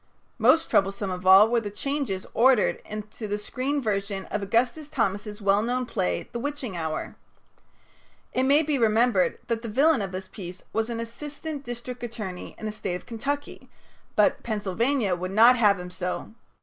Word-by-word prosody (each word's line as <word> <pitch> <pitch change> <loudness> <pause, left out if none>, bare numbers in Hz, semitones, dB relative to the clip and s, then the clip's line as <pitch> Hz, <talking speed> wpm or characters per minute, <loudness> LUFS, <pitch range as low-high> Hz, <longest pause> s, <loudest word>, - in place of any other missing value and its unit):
Most 325 - +5
troublesome 195 0 +1
of 185 0 -4
all 190 +3 +9
were 235 0 +1
the 210 - -4
changes 270 -4 -2
ordered 250 -1 +4
into 215 +1 -6
the 205 0 -1
screen 265 +7 -2
version 200 -4 -2
of 210 - -1
Augustus 245 +9 0
Thomas's 210 -5 -2
well 200 +1 +4
known 250 +3 -1
play 90 - -2
"The 235 - -4
Witching 280 -6 -4
Hour." 160 -2 -3 1.2
It 255 - +1
may 280 +4 +4
be 295 -3 0
remembered 225 -3 +3
that 230 -1 -1
the 230 - -5
villain 275 +3 +3
of 195 -2 -4
this 190 0 -5
piece 180 -2 -9
was 225 +1 0
an 230 -1 -3
assistant 290 +5 -6
district 245 0 -6
attorney 215 -6 -6
in - - -7
the 215 - -2
State 195 -4 -4
of 180 - -8
Kentucky, 280 +5 -4 0.5
but - - +3
Pennsylvania 215 +1 0
would 185 +1 -4
not 230 +6 +7
have 205 -5 +4
him 180 0 -7
so. 180 +2 -4
220 Hz, 175 wpm, -26 LUFS, 195-255 Hz, 1.2 s, all